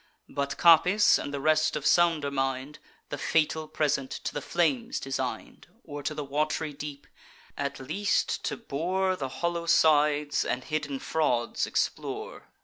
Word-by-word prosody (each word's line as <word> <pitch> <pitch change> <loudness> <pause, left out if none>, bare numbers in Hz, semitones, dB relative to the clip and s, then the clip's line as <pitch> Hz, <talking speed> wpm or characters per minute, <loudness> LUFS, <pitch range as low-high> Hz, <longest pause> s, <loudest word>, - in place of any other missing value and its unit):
But 140 0 -3
Capys, 180 +5 +6
and - - -5
the 140 - -3
rest 155 +2 +2
of 150 -1 -4
sounder 165 -5 +3
mind, 135 +1 -2 0.3
The 145 - -5
fatal 160 0 +1
present 140 -4 -1
to - - -5
the 145 - -3
flames 230 - 0
designed, 135 0 -5 0.2
Or 145 0 -7
to 150 +2 -3
the 150 - -4
wat'ry 150 +2 -1
deep; 145 0 -8 0.5
at 140 -1 -3
least 155 +10 -1
to - - -2
bore 185 +1 -1
The 135 -6 -4
hollow 170 +3 -3
sides, 150 -2 +3
and 125 +1 -2
hidden 150 -2 -3
frauds 125 -5 0
explore. - - -3
150 Hz, 145 wpm, -28 LUFS, 140-165 Hz, 0.5 s, Capys